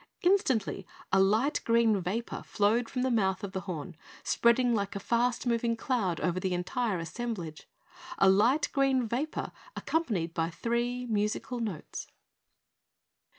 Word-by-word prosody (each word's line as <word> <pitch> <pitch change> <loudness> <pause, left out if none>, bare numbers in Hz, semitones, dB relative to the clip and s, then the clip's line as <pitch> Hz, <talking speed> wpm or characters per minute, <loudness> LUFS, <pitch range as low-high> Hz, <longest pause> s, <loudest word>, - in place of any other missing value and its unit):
Instantly 260 - +2 0.3
a 195 - +6
light 215 +9 +3
green 230 -3 +3
vapor 205 +7 -3
flowed 225 +3 +1
from 250 -1 -2
the 260 - +1
mouth 195 -3 +1
of 200 - -4
the 190 - -3
horn, 175 -3 -6 0.3
spreading 235 +1 +3
like 200 -1 -1
a - - -2
fast 240 +4 0
moving 235 -1 +1
cloud 225 - 0
over 180 0 0
the 185 -1 -1
entire 205 +3 -1
assemblage 170 -3 -5 0.5
a 195 - +5
light 230 +10 +4
green 270 -3 +2
vapor 270 +8 -2 0.2
accompanied 205 - -1
by 165 -1 0
three 240 +6 -2
musical 215 +2 -1
notes. 210 -9 -5
225 Hz, 140 wpm, -30 LUFS, 190-245 Hz, 0.5 s, a